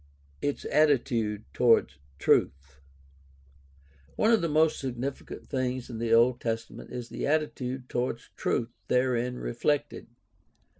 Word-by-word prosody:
Its 145 Hz, -, -2 dB
attitude 120 Hz, -8 st, +2 dB
toward 115 Hz, -10 st, +4 dB, 0.2 s
truth. 70 Hz, -1 st, +1 dB, 0.6 s
— 70 Hz, +1 st, -30 dB
One 220 Hz, -, +3 dB
of 225 Hz, -, +4 dB
the 170 Hz, -, 0 dB
most 155 Hz, +1 st, +3 dB
significant 130 Hz, +1 st, -5 dB
things 130 Hz, -1 st, -2 dB
in 115 Hz, -, -6 dB
the 115 Hz, -1 st, -1 dB
Old 120 Hz, +2 st, +5 dB
Testament 115 Hz, -1 st, -4 dB
is 120 Hz, -1 st, -6 dB
the -, -, -3 dB
attitude 135 Hz, -4 st, -1 dB
toward 120 Hz, -1 st, -1 dB, 0.2 s
truth 115 Hz, 0 st, -1 dB, 0.2 s
therein 125 Hz, -1 st, +1 dB
reflected. 145 Hz, +5 st, -1 dB
125 Hz, 120 wpm, -28 LUFS, 115-135 Hz, 0.6 s, Old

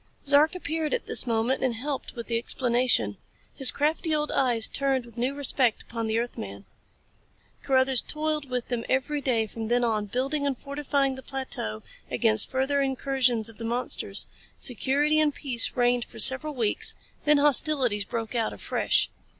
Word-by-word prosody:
Zark 290 Hz, +4 st, +4 dB
appeared 320 Hz, -1 st, -2 dB
at -, -, -5 dB
this -, -, +1 dB
moment 230 Hz, +3 st, 0 dB
and 250 Hz, -3 st, +1 dB
helped 270 Hz, +4 st, -4 dB
with 235 Hz, -1 st, -6 dB
the 230 Hz, -1 st, 0 dB
explanation. 240 Hz, -, +1 dB, 0.4 s
His 265 Hz, -2 st, +3 dB
crafty 310 Hz, +2 st, 0 dB
old 300 Hz, 0 st, -1 dB
eyes 240 Hz, -4 st, +2 dB
turned 270 Hz, -3 st, -1 dB
with 235 Hz, -, -15 dB
new 250 Hz, +3 st, -1 dB
respect 260 Hz, -4 st, +1 dB
upon 230 Hz, -1 st, -4 dB
the 220 Hz, +1 st, 0 dB
earthman. 100 Hz, -, -5 dB, 1.0 s
Carruthers 260 Hz, -1 st, +3 dB
toiled 305 Hz, -2 st, -2 dB
with 250 Hz, -1 st, -3 dB
them 240 Hz, -2 st, -2 dB
every 285 Hz, +3 st, 0 dB
day 235 Hz, -5 st, +1 dB
from 220 Hz, +1 st, -6 dB
then 245 Hz, +1 st, +2 dB
on, 215 Hz, -3 st, 0 dB
building 275 Hz, +6 st, -1 dB
and 270 Hz, -2 st, -1 dB
fortifying 280 Hz, -1 st, -1 dB
the 265 Hz, -, -8 dB
plateau 260 Hz, -, -4 dB, 0.3 s
against 110 Hz, 0 st, +2 dB
further 270 Hz, +2 st, +1 dB
incursions 265 Hz, -4 st, +1 dB
of 225 Hz, -1 st, -4 dB
the -, -, -6 dB
monsters. 240 Hz, +2 st, -1 dB, 0.3 s
Security 285 Hz, +5 st, +1 dB
and 300 Hz, -2 st, +2 dB
peace 245 Hz, -5 st, +1 dB
reigned 245 Hz, -1 st, +2 dB
for -, -, -15 dB
several 270 Hz, +3 st, +3 dB
weeks 225 Hz, -4 st, 0 dB, 0.3 s
then 300 Hz, 0 st, +5 dB
hostilities 280 Hz, -6 st, +3 dB
broke 225 Hz, +2 st, -5 dB
out 230 Hz, -2 st, -1 dB
afresh. -, -, 0 dB
260 Hz, 165 wpm, -26 LUFS, 230-285 Hz, 1.0 s, then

